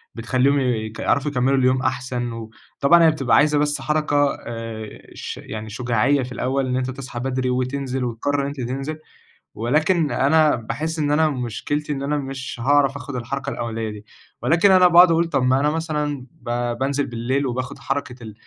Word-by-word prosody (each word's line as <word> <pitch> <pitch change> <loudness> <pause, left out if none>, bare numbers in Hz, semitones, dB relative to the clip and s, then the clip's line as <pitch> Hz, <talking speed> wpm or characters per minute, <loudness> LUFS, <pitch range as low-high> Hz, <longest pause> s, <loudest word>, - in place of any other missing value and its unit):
بتخلّيهم 135 +2 +1
يك 110 -4 -2
يعرَفوا 140 +1 +1
يكمّلوا 135 +1 +2
اليوم 130 0 +2
أحسن 125 -1 -2 0.5
وطبعًا 170 +3 +6
هي 160 - +6
بتبقى 135 -6 +1
عايزة 150 +1 +4
بس 145 -1 0
حركة 145 -1 +1
آآ، 115 -2 -7
ش - - -6
يعني 110 0 -7
شُجاعية 125 +4 +1
في 125 - -7
الأول 130 +2 -1
إن 125 - 0
أنت 130 0 -2
تصحى 130 -2 -7
بدري 130 0 -1
وتنزِل 130 +1 -2
وتقرّر 140 +5 -1
إن 140 - -2
أنت 140 -2 -6
تنزِل. 135 +5 -4 0.6
ولكن 155 - +1
أنا 155 +1 +3
باحس 155 +8 -4
إن 145 -1 +1
أنا 155 +1 +3
مشكلتي 145 +4 -3
إن 135 0 -4
أنا 150 +1 0
مش 135 -2 -6
هاعرَف 140 0 +3
آخُد 140 0 -7
الحركة 135 +3 -4
الأولية 115 -3 -3
دي 105 0 -9 0.4
ولكن 170 +5 +4
أنا 185 -1 +7
باقعُد 175 0 +7
اقول 165 +1 +3
طَب 130 - +1
ما 130 +1 +3
أنا 150 +1 +2
مثلا 150 -4 -2
ب 120 0 -3
بانزِل 140 +2 0
بالليل 125 +4 -1
وباخُد 125 +1 -4
حركة 135 -2 -3
ال 110 -2 -8
135 Hz, 180 wpm, -22 LUFS, 125-145 Hz, 0.6 s, أنا